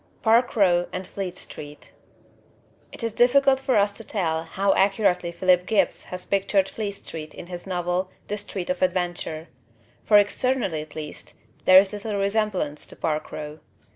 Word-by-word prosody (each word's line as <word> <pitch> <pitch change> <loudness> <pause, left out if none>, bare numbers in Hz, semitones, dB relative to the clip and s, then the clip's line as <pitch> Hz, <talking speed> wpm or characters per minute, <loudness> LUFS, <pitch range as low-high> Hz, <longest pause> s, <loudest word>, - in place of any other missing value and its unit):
Park 235 +2 +3
Row 175 -4 +3
and 185 +1 -5
Fleet 185 -1 -5
Street 145 0 -10 1.0
It - - -8
is 230 - -1
difficult 265 +3 +4
for 265 -3 +1
us 205 0 +3
to 225 - -7
tell 165 -7 -2
how 195 +4 +1
accurately 195 -3 +2
Philip 180 +1 +2
Gibbs 200 -5 +1
has 180 0 -8
pictured 195 0 +1
Fleet 205 0 -4
Street 155 -5 -8
in - - -8
his 175 +1 -8
novel 180 0 -1 0.2
The 210 0 -3
Street 190 -3 -4
of 180 - -4
Adventure; 175 -3 -1 0.5
for, 210 - +6
externally 205 -4 +1
at 155 - -12
least, 150 -1 -8 0.3
there 185 - +8
is 195 +1 +5
little 210 0 -4
resemblance 200 -7 -1
to - - -8
Park 155 -1 -2
Row. 155 0 -7
185 Hz, 165 wpm, -24 LUFS, 175-210 Hz, 1.0 s, there